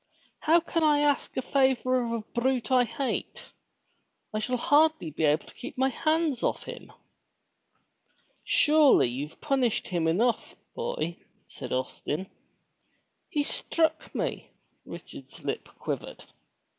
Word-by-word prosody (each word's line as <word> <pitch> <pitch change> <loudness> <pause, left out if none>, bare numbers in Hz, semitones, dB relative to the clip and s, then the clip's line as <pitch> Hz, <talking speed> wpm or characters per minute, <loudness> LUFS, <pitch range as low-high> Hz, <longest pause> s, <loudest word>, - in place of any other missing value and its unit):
How 330 +2 +4
can 330 0 -1
I 295 -1 +4
ask 290 -1 +1
a 260 - 0
favor 255 -2 +2
of 235 - -3
a 230 -1 -1 0.2
brute 260 0 0
I 250 -1 +5
hate? 270 +3 -4 0.8
I 215 - 0
shall 250 +4 -1
hardly 295 - +3
be 155 +2 0
able 150 +2 +2
to - - -15
keep 255 - -9
my 265 +1 +3
hands 310 -1 0
off - - 0
him." - - -9 1.5
Surely 300 - +5
you've 140 +6 -5
punished 265 -6 0
him 170 -3 0
enough, 225 +9 +1 0.2
boy," 470 - -3 0.3
said - - -8
Austin. 145 +7 -3 1.0
''He 295 -5 +1
struck 320 +1 -1
me!" - - -3 0.4
Richard's - - -11
lip - - -3
quivered. - - -5
260 Hz, 130 wpm, -28 LUFS, 210-300 Hz, 1.5 s, I